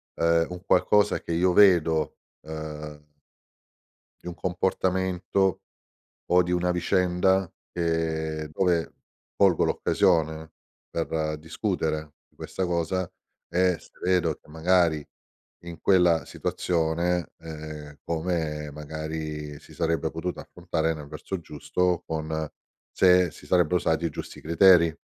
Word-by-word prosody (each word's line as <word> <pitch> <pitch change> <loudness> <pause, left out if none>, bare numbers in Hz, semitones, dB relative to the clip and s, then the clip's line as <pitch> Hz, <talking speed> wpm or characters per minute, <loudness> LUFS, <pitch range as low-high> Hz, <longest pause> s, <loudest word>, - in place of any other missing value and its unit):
ehm, 85 0 +2
un 90 +1 -8
qualcosa 105 +1 +3
che - - -6
io 90 +2 +2
vedo, 85 -6 +4 0.2
uhm 75 -1 -7 1.2
di - - -14
un 90 - -5
comportamento, 95 +1 0 0.7
o 90 +1 +4
di 90 0 -2
una 90 0 +1
vicenda, 90 +1 +2 0.2
che 80 -2 -1
dove 85 -1 +1 0.4
colgo 95 -4 +4
l'occasione, 80 -2 +1 0.4
per 80 -2 -2
discutere 80 -2 -3
di - - -36
questa 95 - -4
cosa, 85 +1 -1 0.4
e 90 -1 +2
se - - -19
vedo 90 -3 +2
che - - -22
magari 80 -2 +2 0.6
in 85 -1 -8
quella 90 -4 +4
situazione 85 +1 -1
ehm, 75 -2 -9
come 80 -3 -2
magari 75 0 -5
si - - -16
sarebbe 80 -1 0
potuta 85 +2 -4
affrontare 85 -2 -2
nel 75 -2 -9
verso 75 +5 -5
giusto, 85 +3 -1
con 80 -1 -3 0.4
se 90 -1 +5
si - - -15
sarebbero 90 -1 +2
usati 80 -1 0
i 85 - +1
giusti - - -8
criteri. 85 0 +5
85 Hz, 115 wpm, -26 LUFS, 80-90 Hz, 1.2 s, se